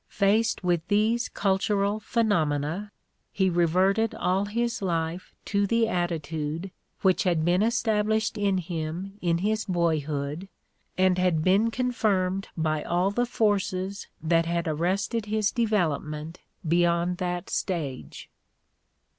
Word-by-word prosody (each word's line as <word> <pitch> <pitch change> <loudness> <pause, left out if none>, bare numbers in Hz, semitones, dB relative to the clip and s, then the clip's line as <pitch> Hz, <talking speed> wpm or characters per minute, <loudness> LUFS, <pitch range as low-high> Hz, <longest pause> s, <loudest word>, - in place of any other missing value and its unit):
Faced 215 +2 +1
with 175 -2 0
these 220 +4 +2
cultural 200 +1 0
phenomena, 185 -4 0 0.4
he 190 -2 +1
reverted 185 +6 +2
all 185 +2 0
his 235 +3 -2
life 170 -1 -2
to 200 -1 +1
the 230 +1 +2
attitude 165 -2 -2 0.3
which 190 -2 +3
had 170 -5 +1
been 180 +2 +3
established 220 -1 +1
in 200 -2 +1
him 175 +3 -4
in 170 -1 +1
his 215 +4 0
boyhood 155 -2 -1 0.5
and 185 -1 +3
had 175 -4 +2
been 195 +6 +3
confirmed 205 -6 0
by 155 -1 0
all 180 +5 +1
the 245 +4 0
forces 200 -3 -1 0.2
that 165 +1 +2
had 170 0 -1
arrested 190 +8 -1
his 215 -1 +1
development 165 - -1 0.3
beyond 170 +1 +2
that 180 0 -3
stage. 140 - -4
185 Hz, 120 wpm, -26 LUFS, 170-210 Hz, 0.5 s, which